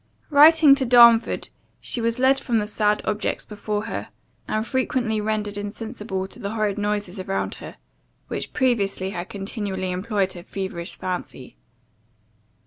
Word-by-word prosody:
Writing 300 0 +8
to 275 -1 +2
Darnford, 235 -2 +5 0.3
she 240 - -1
was 230 +1 0
led 265 +1 +3
from 240 -4 0
the 210 - 0
sad 210 0 +1
objects 210 0 -2
before 210 0 -4
her, 225 - -5 0.4
and 215 +1 -1
frequently 245 -4 -1
rendered 210 -1 -2
insensible 205 -2 -5
to 190 - -13
the 200 +2 -4
horrid 210 -2 -1
noises 205 -2 -2
around 195 +1 -2
her, - - -9 0.5
which - - -5
previously 200 -7 0
had 175 -1 -6
continually 195 -2 -4
employed 195 +1 -1
her 175 - -9
feverish 190 -2 -5
fancy. 180 -8 -6
210 Hz, 140 wpm, -23 LUFS, 195-230 Hz, 0.5 s, Writing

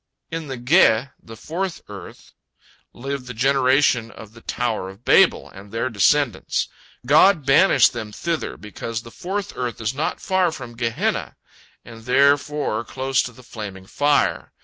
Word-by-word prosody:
In 165 -1 -4
the 135 -2 -5
Ge, 125 -2 +3
the 115 0 -12
fourth 175 - -4
earth, 100 -4 -11 0.6
live 135 0 -6
the 125 - -7
generation 130 -1 +2
of 110 -1 -13
the 115 - -15
Tower 110 -7 -2
of 100 +5 -15
Babel - - +4
and 100 +1 -13
their 115 +2 -2
descendants. 115 +1 +1 0.4
God 155 +3 +5
banished 135 -1 +5
them 110 -3 -6
thither 165 +8 -3
because 110 +2 -6
the 115 - -12
fourth 200 - -4
earth 125 -2 -4
is 115 +1 -2
not 145 +4 -2
far 185 -3 +1
from 125 -6 -9
Gehenna, 115 -1 -2 0.5
and 115 -1 -12
therefore 140 -2 +2
close 135 +2 -1
to 125 - -5
the 125 +2 -16
flaming 100 -5 -8
fire. 145 +8 +1
125 Hz, 150 wpm, -22 LUFS, 115-145 Hz, 0.6 s, God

